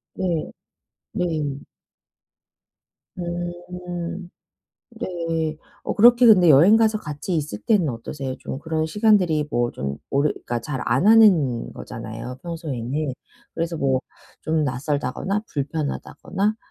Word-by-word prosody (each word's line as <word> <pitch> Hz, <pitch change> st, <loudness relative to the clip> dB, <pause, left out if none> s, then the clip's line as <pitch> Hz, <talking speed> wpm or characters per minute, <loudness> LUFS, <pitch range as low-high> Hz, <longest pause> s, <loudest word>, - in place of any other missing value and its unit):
네. 175 Hz, -4 st, -1 dB, 0.6 s
네. 155 Hz, -6 st, -2 dB, 1.6 s
음. 175 Hz, 0 st, -5 dB, 0.6 s
네. 165 Hz, -7 st, -3 dB, 0.3 s
어, -, -, -2 dB
그렇게 240 Hz, +3 st, +6 dB
근데 185 Hz, -7 st, +7 dB
여행 165 Hz, +10 st, +7 dB
가서 220 Hz, -1 st, +3 dB
같이 150 Hz, 0 st, -5 dB
있을 145 Hz, -9 st, -3 dB
때는 195 Hz, -10 st, +2 dB
어떠세요 130 Hz, +3 st, -5 dB
좀? 135 Hz, -, -5 dB
그런 160 Hz, 0 st, -1 dB
시간들이 175 Hz, -5 st, +2 dB
뭐 120 Hz, -2 st, 0 dB
좀 70 Hz, +2 st, -4 dB
오래 140 Hz, +2 st, +2 dB
그러니까 120 Hz, -1 st, -4 dB
잘 135 Hz, -1 st, -4 dB
안 130 Hz, +10 st, +2 dB
하는 180 Hz, -, +5 dB
거잖아요, 115 Hz, +3 st, -7 dB
평소에는. 150 Hz, -4 st, -3 dB, 0.4 s
그래서 165 Hz, 0 st, -2 dB
뭐 135 Hz, -2 st, +1 dB, 0.4 s
좀 160 Hz, -1 st, 0 dB
낯설다거나 145 Hz, +8 st, -1 dB
불편하다거나 160 Hz, +7 st, -2 dB
160 Hz, 240 characters per minute, -23 LUFS, 135-180 Hz, 1.6 s, 근데